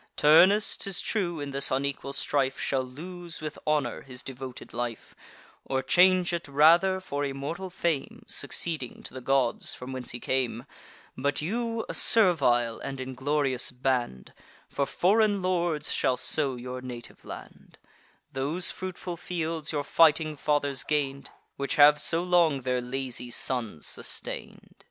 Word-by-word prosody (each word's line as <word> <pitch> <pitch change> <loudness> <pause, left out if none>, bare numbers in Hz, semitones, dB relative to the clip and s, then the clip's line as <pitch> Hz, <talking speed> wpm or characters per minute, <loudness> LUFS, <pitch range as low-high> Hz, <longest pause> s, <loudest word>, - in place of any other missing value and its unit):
Turnus, 185 +8 +5
'tis 195 -1 -2
true, 175 -8 -2
in 145 -1 -5
this 140 0 +1
unequal 140 +1 -2
strife, 135 -1 0
Shall 135 -1 0
lose, 170 +6 -8
with 155 -1 -6
honour, 150 -2 0
his 125 -2 -9
devoted 130 -1 -8
life, 120 -1 -5 0.5
Or 130 0 -2
change 180 +4 +4
it 170 -2 -3
rather 170 +7 +5
for 145 -6 -4
immortal 145 +7 -4
fame, 170 -5 -2
Succeeding 155 -8 -2
to - - -8
the 130 - -7
gods, 130 -2 +1
from 125 +1 -8
whence 130 -1 -6
he 120 - -3
came: 125 -3 -1 0.5
But 140 +2 -1
you, 230 +5 -2
a - - -5
servile 130 - +4
and 135 -1 -6
inglorious 130 0 -1
band, 125 - -2 0.3
For 140 - -2
foreign 205 +1 +2
lords 170 -5 0
shall 125 - +1
sow 140 -2 +1
your 125 +1 -6
native 125 -2 -9
land, - - -11 0.6
Those 145 +7 0
fruitful 185 -2 -6
fields 165 -3 -3
your 145 -2 -1
fighting 155 0 +4
fathers 145 -2 0
gain'd, 140 -2 -1 0.3
Which 140 0 -2
have 150 -1 +7
so 165 +2 +1
long 170 -6 +3
their 125 0 -1
lazy 125 -1 -4
sons 115 - -3
sustain'd." - - -5
145 Hz, 140 wpm, -27 LUFS, 130-170 Hz, 0.6 s, have